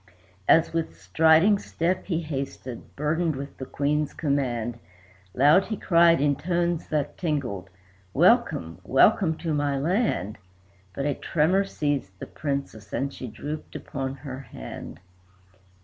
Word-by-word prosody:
As 165 Hz, 0 st, +5 dB
with 165 Hz, -1 st, -3 dB
striding 165 Hz, +6 st, +4 dB
step 180 Hz, +1 st, -2 dB
he 170 Hz, -3 st, 0 dB
hasted, 135 Hz, -5 st, -6 dB
burdened 155 Hz, +2 st, 0 dB
with 140 Hz, +1 st, -7 dB
the 130 Hz, -, -6 dB
Queen's 150 Hz, +1 st, -1 dB
command, 120 Hz, -6 st, -1 dB, 0.6 s
Loud 150 Hz, +9 st, +5 dB
he 215 Hz, -, -4 dB
cried, 170 Hz, -1 st, +5 dB
in 145 Hz, 0 st, +2 dB
tones 170 Hz, +1 st, -1 dB
that 145 Hz, -1 st, -2 dB
tingled, 125 Hz, -, -2 dB, 0.4 s
"Welcome, 85 Hz, -2 st, +3 dB
welcome, 160 Hz, -, +4 dB
to 165 Hz, -2 st, -2 dB
my 145 Hz, -1 st, 0 dB
land!" 150 Hz, -, 0 dB, 0.6 s
But 140 Hz, -, -2 dB
a 145 Hz, -, +1 dB
tremor 175 Hz, +8 st, +1 dB
seized 145 Hz, -, -2 dB
the -, -, -7 dB
Princess, 140 Hz, -8 st, -4 dB
and 140 Hz, +1 st, -2 dB
she 130 Hz, -, -7 dB
drooped 145 Hz, +7 st, -7 dB
upon 135 Hz, -2 st, -4 dB
her 130 Hz, -1 st, -7 dB
hand. 60 Hz, -, -9 dB
145 Hz, 135 wpm, -26 LUFS, 135-165 Hz, 0.6 s, As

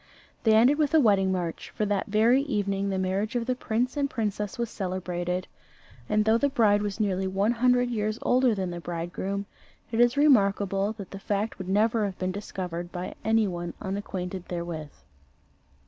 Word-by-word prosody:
They 220 Hz, -1 st, +6 dB
ended 255 Hz, +7 st, +5 dB
with 300 Hz, +1 st, +2 dB
a -, -, +7 dB
wedding 200 Hz, -7 st, +4 dB
march: 175 Hz, -3 st, -3 dB
for 210 Hz, -, 0 dB
that 205 Hz, -1 st, -1 dB
very 225 Hz, +6 st, +4 dB
evening 200 Hz, -7 st, -1 dB
the 190 Hz, -, -1 dB
marriage 190 Hz, +4 st, -1 dB
of 235 Hz, -1 st, 0 dB
the 255 Hz, -, +1 dB
prince 250 Hz, +1 st, -1 dB
and 285 Hz, -1 st, 0 dB
princess 210 Hz, -2 st, -3 dB
was 235 Hz, -1 st, -2 dB
celebrated, 180 Hz, -2 st, -3 dB, 0.6 s
and 210 Hz, 0 st, +2 dB
though 220 Hz, +1 st, +4 dB
the 285 Hz, -, +2 dB
bride 215 Hz, -6 st, +3 dB
was 205 Hz, 0 st, -3 dB
nearly 190 Hz, -3 st, 0 dB
one 195 Hz, +4 st, +1 dB
hundred 245 Hz, +1 st, +2 dB
years 215 Hz, -1 st, -1 dB
older 250 Hz, -2 st, +3 dB
than 190 Hz, -2 st, -2 dB
the 175 Hz, -, -5 dB
bridegroom, 175 Hz, +4 st, -4 dB, 0.5 s
it 225 Hz, -, -1 dB
is 240 Hz, +2 st, +4 dB
remarkable 200 Hz, -7 st, +3 dB
that 200 Hz, -4 st, -10 dB
the 195 Hz, -, -7 dB
fact 205 Hz, 0 st, -2 dB
would 185 Hz, -1 st, -6 dB
never 215 Hz, +2 st, +2 dB
have 195 Hz, -2 st, -4 dB
been 185 Hz, 0 st, -1 dB
discovered 180 Hz, -3 st, -5 dB
by 180 Hz, 0 st, -5 dB
any 220 Hz, -1 st, +3 dB
one 175 Hz, -2 st, -5 dB
unacquainted 190 Hz, -2 st, -4 dB
therewith. 170 Hz, -3 st, -4 dB
205 Hz, 180 wpm, -27 LUFS, 185-225 Hz, 0.6 s, a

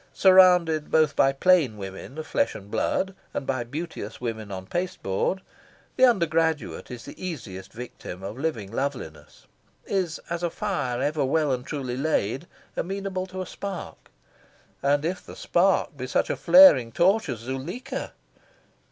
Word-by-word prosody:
Surrounded 180 Hz, -5 st, +5 dB
both 155 Hz, -2 st, +3 dB
by 135 Hz, -, +4 dB
plain 140 Hz, -5 st, +3 dB
women 95 Hz, +8 st, -8 dB
of 155 Hz, -, -5 dB
flesh 115 Hz, -, 0 dB
and 100 Hz, 0 st, -10 dB
blood 195 Hz, 0 st, 0 dB, 0.2 s
and -, -, -2 dB
by 130 Hz, -3 st, -1 dB
beauteous 140 Hz, -4 st, -6 dB
women 110 Hz, -4 st, -4 dB
on 95 Hz, -1 st, -6 dB
pasteboard, 175 Hz, -, -2 dB, 0.5 s
the 255 Hz, -, +2 dB
undergraduate 165 Hz, -, +1 dB
is 125 Hz, -2 st, -8 dB
the -, -, -10 dB
easiest 110 Hz, -, -6 dB
victim 110 Hz, -5 st, -8 dB
of 100 Hz, +2 st, -5 dB
living 125 Hz, -9 st, -3 dB
loveliness 115 Hz, -, -5 dB, 0.4 s
is 185 Hz, -5 st, -1 dB
as 170 Hz, 0 st, -3 dB
a 175 Hz, -, 0 dB
fire 160 Hz, -11 st, -2 dB
ever 145 Hz, 0 st, 0 dB
well 150 Hz, +2 st, +1 dB
and 125 Hz, +1 st, -4 dB
truly 130 Hz, -4 st, -3 dB
laid, 135 Hz, 0 st, 0 dB, 0.3 s
amenable 190 Hz, 0 st, -3 dB
to 185 Hz, 0 st, -5 dB
a -, -, -9 dB
spark. 195 Hz, -1 st, -7 dB, 0.7 s
And 145 Hz, +2 st, +2 dB
if 180 Hz, +2 st, -2 dB
the -, -, -11 dB
spark 180 Hz, -2 st, +2 dB
be 130 Hz, -2 st, -5 dB
such -, -, +1 dB
a -, -, -1 dB
flaring 150 Hz, -5 st, +7 dB
torch 190 Hz, -, +3 dB
as 125 Hz, -, -2 dB
Zuleika? 175 Hz, -, -5 dB
150 Hz, 150 wpm, -25 LUFS, 120-180 Hz, 0.7 s, flaring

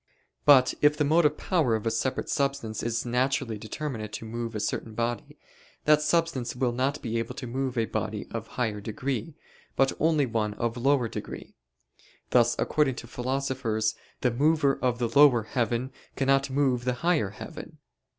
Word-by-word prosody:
But 130 Hz, -3 st, +7 dB
if 150 Hz, 0 st, +4 dB
the 150 Hz, -, +2 dB
motive 150 Hz, 0 st, +3 dB
power 155 Hz, -, +1 dB
of 110 Hz, -, -4 dB
a 115 Hz, -, +1 dB
separate 130 Hz, -, -1 dB
substance 140 Hz, -7 st, -1 dB
is 115 Hz, 0 st, -2 dB
naturally 125 Hz, -2 st, 0 dB
determinate 110 Hz, -2 st, -5 dB
to -, -, -6 dB
move 115 Hz, 0 st, -5 dB
a -, -, -1 dB
certain 110 Hz, +1 st, -3 dB
body, 120 Hz, +1 st, -3 dB, 0.5 s
that 150 Hz, 0 st, +5 dB
substance 150 Hz, -6 st, 0 dB
will 125 Hz, -1 st, +1 dB
not 135 Hz, +4 st, -1 dB
be 115 Hz, -2 st, -1 dB
able 115 Hz, +2 st, -4 dB
to 135 Hz, -, -6 dB
move 130 Hz, +1 st, -3 dB
a 115 Hz, -, +2 dB
body 105 Hz, -1 st, -3 dB
of 115 Hz, -1 st, -5 dB
higher 110 Hz, -4 st, -1 dB
degree, 125 Hz, +6 st, -4 dB, 0.4 s
but 135 Hz, 0 st, +3 dB
only 155 Hz, -3 st, +3 dB
one 110 Hz, -3 st, -1 dB
of 115 Hz, 0 st, -2 dB
lower 130 Hz, 0 st, +2 dB
degree: -, -, -7 dB, 0.8 s
thus 120 Hz, -1 st, +4 dB
according 145 Hz, -4 st, +1 dB
to -, -, -8 dB
philosophers 125 Hz, -3 st, -1 dB, 0.3 s
the 125 Hz, -, +2 dB
mover 145 Hz, +2 st, +2 dB
of 125 Hz, -2 st, +1 dB
the 120 Hz, -1 st, 0 dB
lower 125 Hz, -1 st, +5 dB
heaven 120 Hz, +2 st, -1 dB, 0.2 s
cannot 135 Hz, 0 st, +2 dB
move 130 Hz, -3 st, +1 dB
the 125 Hz, 0 st, 0 dB
higher 160 Hz, -, +2 dB
heaven. -, -, -9 dB
125 Hz, 170 wpm, -27 LUFS, 115-140 Hz, 0.8 s, But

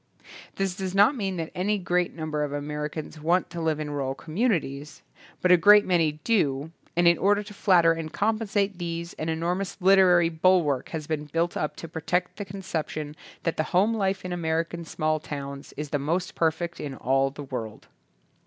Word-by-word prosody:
This 195 Hz, -1 st, -1 dB
does 190 Hz, -1 st, -4 dB
not 205 Hz, +8 st, +5 dB
mean 195 Hz, -6 st, -2 dB
that 165 Hz, -1 st, -4 dB
any 205 Hz, +4 st, 0 dB
great 180 Hz, -2 st, 0 dB
number 155 Hz, -2 st, -2 dB
of 145 Hz, -, -3 dB
Americans 150 Hz, +2 st, -5 dB
want 175 Hz, +2 st, +1 dB
to 170 Hz, -1 st, -5 dB
live 160 Hz, -2 st, 0 dB
in 150 Hz, -1 st, -4 dB
rural 135 Hz, -2 st, -2 dB
communities; 155 Hz, -, -2 dB, 0.4 s
but 180 Hz, -, +3 dB
a 180 Hz, -, +8 dB
great 205 Hz, +4 st, +7 dB
many 165 Hz, -4 st, +2 dB
do, 150 Hz, -9 st, +1 dB, 0.2 s
and 175 Hz, 0 st, +4 dB
in 170 Hz, -1 st, +5 dB
order 205 Hz, +2 st, +3 dB
to 210 Hz, 0 st, -11 dB
flatter 175 Hz, -4 st, +4 dB
and 165 Hz, -1 st, -5 dB
compensate 210 Hz, -2 st, 0 dB
these 170 Hz, 0 st, -4 dB
an 155 Hz, -, -2 dB
enormous 175 Hz, +5 st, -2 dB
lit 195 Hz, +1 st, +6 dB
erary 175 Hz, -3 st, +5 dB
bulwark 170 Hz, -8 st, +3 dB
has 155 Hz, -2 st, -5 dB
been 150 Hz, -1 st, -3 dB
built 165 Hz, +3 st, -1 dB
up 150 Hz, -, -2 dB
to 165 Hz, -, -8 dB
protect 175 Hz, +3 st, -2 dB
the 205 Hz, -, -4 dB
conception 160 Hz, -6 st, -4 dB, 0.3 s
that, 165 Hz, -, -1 dB
the 155 Hz, -, +2 dB
home 210 Hz, +5 st, +4 dB
life 195 Hz, -3 st, -1 dB
in 180 Hz, -, -3 dB
American 165 Hz, 0 st, -2 dB
small 155 Hz, 0 st, -1 dB
towns 140 Hz, -2 st, -7 dB
is 150 Hz, 0 st, -5 dB
the 145 Hz, -, 0 dB
most 170 Hz, +6 st, -1 dB
perfect 170 Hz, +1 st, -1 dB
in 140 Hz, -2 st, -5 dB
all 135 Hz, +2 st, +1 dB
the 145 Hz, +1 st, -9 dB
world. 115 Hz, -6 st, -6 dB
170 Hz, 190 wpm, -26 LUFS, 150-185 Hz, 0.4 s, a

